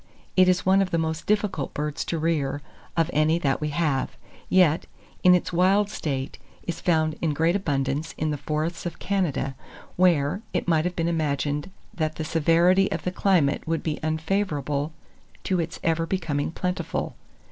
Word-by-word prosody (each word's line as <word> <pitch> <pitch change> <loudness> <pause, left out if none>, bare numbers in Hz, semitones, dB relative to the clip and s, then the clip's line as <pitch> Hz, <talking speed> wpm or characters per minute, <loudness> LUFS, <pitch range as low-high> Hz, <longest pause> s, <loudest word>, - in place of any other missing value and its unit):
It 185 -1 +6
is 180 0 +2
one 190 +1 +5
of 190 - 0
the 170 - 0
most 160 -1 -2
difficult 205 -8 0
birds 150 +1 -2
to 165 - -2
rear, 145 -3 -1 0.3
of 165 +1 +2
any 155 +2 +3
that 140 -5 0
we 150 - -1
have; 145 -3 -1 0.3
yet, 175 -3 +4 0.3
in 180 0 +7
its 180 - -1
wild 195 +4 +3
state, 135 -5 -3 0.2
is 170 - -5
found 155 -3 +2
in 155 -3 0
great 165 +4 +2
abundance 145 -4 -1
in 155 0 0
the 150 - -2
forests 155 +4 -2
of 170 - -6
Canada, 175 -9 -1 0.4
where, 175 -1 +3
it - - -1
might 160 -1 +3
have 180 0 -2
been 165 0 0
imagined 145 -2 -1 0.2
that 155 -1 -2
the 155 - -4
severity 170 +5 +3
of 160 0 -3
the 180 - -1
climate 175 -7 +2
would 165 0 -1
be 155 -2 -2
unfavourable 155 -3 -1 0.5
to 185 -2 0
its 165 0 -3
ever 165 0 +1
becoming 165 -6 -1
plentiful. 180 +2 -3
165 Hz, 170 wpm, -25 LUFS, 150-180 Hz, 0.5 s, in